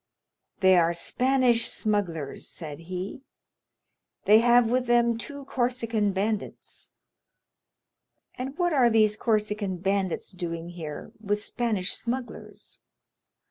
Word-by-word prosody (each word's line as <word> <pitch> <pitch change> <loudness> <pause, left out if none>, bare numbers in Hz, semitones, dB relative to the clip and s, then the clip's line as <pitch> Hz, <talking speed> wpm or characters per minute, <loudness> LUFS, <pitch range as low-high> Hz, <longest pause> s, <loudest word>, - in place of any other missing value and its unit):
"They 190 -1 +6
are 170 0 +2
Spanish 250 +4 +2
smugglers," 175 -9 -2
said 155 -3 -7
he; 185 +7 -5 1.0
"they 215 +2 +7
have 240 0 +4
with 250 0 +1
them 235 -1 +3
two 280 +4 -7
Corsican 235 -5 0
bandits." 205 +2 -3 1.4
"And 265 +4 -6
what 350 -2 +1
are 255 -4 +5
these 215 -2 +4
Corsican 210 -4 -1
bandits 190 0 -1
doing 170 -2 -5
here 160 -4 -7
with 210 -1 -2
Spanish 215 -6 -1
smugglers?" 245 +1 -6
215 Hz, 105 wpm, -27 LUFS, 185-240 Hz, 1.4 s, they